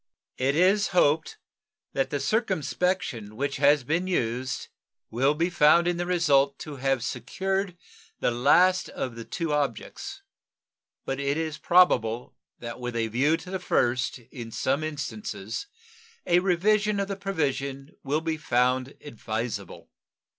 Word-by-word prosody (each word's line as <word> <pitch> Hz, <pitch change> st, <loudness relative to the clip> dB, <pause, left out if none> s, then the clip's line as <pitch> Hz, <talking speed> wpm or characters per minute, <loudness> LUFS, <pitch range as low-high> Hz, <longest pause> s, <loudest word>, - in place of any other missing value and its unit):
It 135 Hz, +2 st, +1 dB
is 190 Hz, +5 st, +4 dB
hoped 155 Hz, 0 st, +3 dB, 0.6 s
that 135 Hz, -, 0 dB
the 145 Hz, -, -2 dB
circumspection 180 Hz, -, -1 dB
which 140 Hz, +3 st, -2 dB
has 145 Hz, -2 st, +4 dB
been 165 Hz, +8 st, 0 dB
used 130 Hz, -6 st, -2 dB, 0.4 s
will 135 Hz, +6 st, +2 dB
be 170 Hz, +3 st, 0 dB
found 170 Hz, +2 st, +5 dB
in 175 Hz, -1 st, +1 dB
the 175 Hz, 0 st, -2 dB
result 145 Hz, -6 st, +3 dB
to 150 Hz, -2 st, -7 dB
have 135 Hz, -2 st, 0 dB
secured 190 Hz, +5 st, -2 dB, 0.4 s
the -, -, +1 dB
last 175 Hz, +10 st, +4 dB
of 125 Hz, -3 st, -4 dB
the 115 Hz, -, -7 dB
two 165 Hz, -3 st, -2 dB
objects; 140 Hz, -5 st, -3 dB, 0.8 s
but 135 Hz, -, -3 dB
it 140 Hz, +1 st, 0 dB
is 160 Hz, -2 st, -3 dB
probable 125 Hz, -10 st, +3 dB, 0.2 s
that 120 Hz, +1 st, -7 dB
with 120 Hz, -1 st, -4 dB
a 115 Hz, -1 st, 0 dB
view 140 Hz, +8 st, +2 dB
to 180 Hz, +2 st, -10 dB
the 190 Hz, -, -2 dB
first 125 Hz, -1 st, +1 dB
in 120 Hz, -1 st, -10 dB
some 135 Hz, +6 st, -1 dB
instances 120 Hz, -, -5 dB, 0.6 s
a 175 Hz, 0 st, +4 dB
revision 200 Hz, +3 st, +2 dB
of 200 Hz, -, -1 dB
the 195 Hz, -, -3 dB
provision 140 Hz, -7 st, -2 dB
will 145 Hz, +3 st, 0 dB
be 160 Hz, -1 st, -2 dB
found 130 Hz, -1 st, +1 dB
advisable. 110 Hz, -, -5 dB
145 Hz, 140 wpm, -26 LUFS, 125-175 Hz, 0.8 s, found